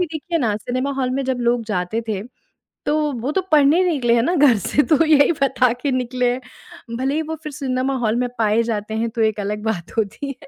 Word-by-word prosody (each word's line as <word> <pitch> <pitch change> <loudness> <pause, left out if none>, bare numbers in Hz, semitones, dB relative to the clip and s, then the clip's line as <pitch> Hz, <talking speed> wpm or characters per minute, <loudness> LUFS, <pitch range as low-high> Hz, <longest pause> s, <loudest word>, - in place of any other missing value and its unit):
भी 360 - +1
देखिए 335 +2 -2
ना 220 -7 0
सिनेमा 255 +5 -3
हॉल 255 -1 0
में 270 +1 -1
जब 260 -1 -1
लोग 240 0 +1
जाते 210 +1 -2
थे, 200 -3 -2 0.6
तो 300 0 +1
वो 265 +5 -1
तो 380 - +1
पढ़ने 305 +4 +5
निकले 260 -9 +2
हैं 235 - +3
ना 345 +8 +1
घर 280 -7 +5
से, 280 +8 +1
तो 315 +1 +3
यही 305 0 +5
बता 260 -2 +3
के 285 - 0
निकले 250 -1 0
हैं। 255 - -6 0.6
भले 265 +3 -1
ही 315 - +1
वो 320 +1 -4
फिर 305 - -5
सिनेमा 265 -1 -2
हॉल 220 -2 0
में 250 0 0
पाए 220 0 +3
जाते 220 -2 -3
हैं 230 - -1
तो 225 +1 -3
एक 220 -1 +1
अलग 210 +1 -3
बात 220 -2 -4
होती 240 +6 -2
है। - - -14
255 Hz, 235 wpm, -20 LUFS, 225-285 Hz, 0.6 s, पढ़ने